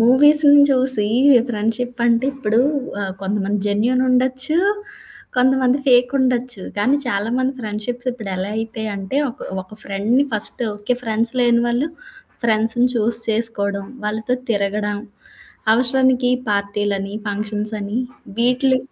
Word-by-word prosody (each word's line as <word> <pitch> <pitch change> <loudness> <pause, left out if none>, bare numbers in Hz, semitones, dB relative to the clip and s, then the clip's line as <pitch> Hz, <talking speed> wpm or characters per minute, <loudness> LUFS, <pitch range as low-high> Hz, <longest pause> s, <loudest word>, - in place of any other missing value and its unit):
మూవీస్‌ని 290 +4 +6
చూసి 255 -5 +4 0.4
ఫ్రెండ్షిప్ 235 +3 -2
అంటే 235 +1 +2
ఇప్పుడు 225 -3 0 0.4
ఆ! - - -2 0.2
కొంతమంది 200 +1 -2
జెన్యూన్ 230 +5 +1
ఉండొచ్చు, 260 +4 +1 0.8
కొంతమంది 260 +1 +2
ఫేకుండొచ్చు. 250 -3 +1
కానీ 250 +8 +2
చాలామంది 240 +5 -1
ఫ్రెండ్షిప్స్ 225 +3 -4
ఇప్పుడు 220 -5 -7
ఎలా 190 +2 -3
అయిపోయాంటే 220 -1 -4
ఒక - - -17 0.2
ఒక 185 - -22
ఫ్రెండ్‌ని 215 +8 0
ఫస్ట్ 220 +3 +1
ఓకే. 205 +4 -2
ఫ్రెండ్స్ 230 0 -1
లేని 235 -1 +3
వాళ్ళు 240 +6 0 0.6
ఫ్రెండ్స్‌‌ని 225 +2 +3
చూజ్ 225 0 +2
చేసుకోవడం, 200 -3 +1 0.2
వాళ్ళతో 220 +3 -2 0.2
తిరగడం, 205 0 -1 0.8
అవసరానికి 255 +1 +2 0.2
పార్టీలని 200 -1 -2
ఫంక్షన్స్‌‌ని 210 +1 -3 0.4
వీట్లు 255 +2 +2
230 Hz, 110 wpm, -19 LUFS, 210-255 Hz, 0.8 s, మూవీస్‌ని